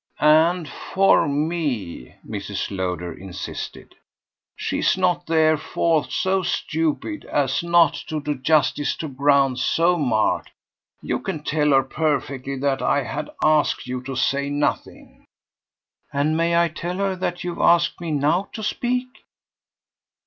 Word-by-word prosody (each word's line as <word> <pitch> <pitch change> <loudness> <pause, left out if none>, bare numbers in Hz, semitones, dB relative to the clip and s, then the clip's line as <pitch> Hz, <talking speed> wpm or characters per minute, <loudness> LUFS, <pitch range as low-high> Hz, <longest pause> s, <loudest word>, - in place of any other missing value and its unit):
"And 160 +2 +4
for 195 +4 +2
ME," 145 - -2
Mrs. 100 -1 -4
Lowder 90 -2 -3
insisted. 95 -2 -8 0.6
"She's - - 0
not 180 -1 0
therefore 160 0 +2
so 190 0 0
stupid 165 - -2
as 135 -3 0
not 170 -1 +4
to 155 - -2
do 150 0 -2
justice 145 +1 +1
to 160 - -5
grounds 140 -1 +2
so 170 +1 +2
marked. 115 -7 +1 0.5
You - - -1
can 150 - -5
tell 150 0 +1
her 135 -1 +5
perfectly 140 -2 -2
that 135 0 -1
I 145 -1 +1
had 145 +4 -5
asked 155 -1 +2
you 125 0 -4
to 135 0 -5
say 140 +2 0
nothing." 145 0 -3 0.9
"And 145 +3 +1
may 170 +1 +2
I 170 0 +3
tell 170 +3 -5
her 195 -1 0
that 175 0 -3
you've 175 -1 -4
asked 170 0 +3
me 170 - -4
now 155 +6 +1
to 220 - -6
speak?" 250 +4 -1
150 Hz, 135 wpm, -22 LUFS, 135-170 Hz, 0.9 s, her